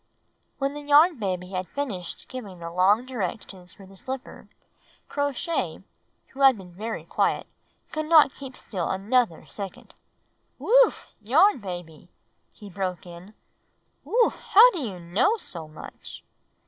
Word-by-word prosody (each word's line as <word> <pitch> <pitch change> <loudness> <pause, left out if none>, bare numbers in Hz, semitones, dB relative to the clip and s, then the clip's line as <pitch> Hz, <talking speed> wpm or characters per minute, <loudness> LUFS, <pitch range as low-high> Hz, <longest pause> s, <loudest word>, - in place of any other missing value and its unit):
"" - - -45
When 275 0 -1
the 295 - -7
Yarn 295 +1 +5
Baby 185 -3 -3
had 185 -1 -3
finished 200 -9 -5
giving 215 -8 -8
the 170 0 -7
long 195 +7 +3
directions 195 -6 -6
for 195 - -14
the 195 +1 -16
slippers, 260 +7 -7 0.6
Crow 285 0 -1
Shay, 330 +5 -3 0.5
who 270 - -14
had 265 -3 +7
been 180 -3 -12
very 220 +5 -5
quiet, - - 0 0.5
could 310 0 -3
not 310 -4 +6
keep 265 -2 -10
still 185 -5 -4
another 205 -1 0
second. 200 -3 -9 0.6
"Whew! - - +5 0.3
Yarn 310 - +4
Baby!" 175 -5 -8 0.4
he 210 - -13
broke 185 -2 -4
in. 175 +4 -12 0.7
"Whew! 470 0 +3
How 465 +5 +6
do 355 - -5
you 210 -10 -5
know 200 - +1
so 170 - -6
much? 155 - -11
210 Hz, 145 wpm, -25 LUFS, 180-280 Hz, 0.7 s, had